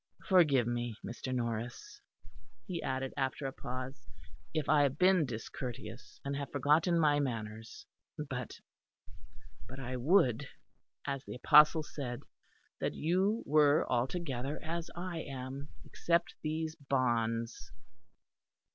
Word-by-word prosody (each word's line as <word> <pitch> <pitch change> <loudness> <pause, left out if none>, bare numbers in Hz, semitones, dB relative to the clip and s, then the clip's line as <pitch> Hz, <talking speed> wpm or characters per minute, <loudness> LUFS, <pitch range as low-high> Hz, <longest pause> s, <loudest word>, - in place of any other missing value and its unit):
"Forgive 150 - +5
me, 120 -2 -2
Mr. 130 +2 -5
Norris," 120 -1 -3 0.6
he 175 -2 -3
added 130 0 -2
after 135 +1 -1
a 135 - -2
pause, 130 -1 -6 0.4
"if 155 -2 -1
I 150 -1 +5
have 140 0 +2
been 180 -4 +4
discourteous, 115 0 -7
and 140 0 -1
have 140 -1 -4
forgotten 150 +5 +3
my 150 -2 +4
manners; 110 -4 -4 0.3
but - - -5 1.1
but 130 +1 -8
I 130 -1 -4
would, 135 - +3 0.6
as 140 -1 -2
the - - -6
apostle 150 +4 +6
said, 125 -5 -5 0.6
that - - -1
you 190 +8 +1
were 150 0 +5
altogether 135 +1 -1
as 170 +1 -3
I 175 -1 -4
am, 135 0 -6 0.2
except 170 0 0
these 155 +1 -2
bonds." 120 -6 -1
140 Hz, 120 wpm, -33 LUFS, 125-155 Hz, 1.1 s, apostle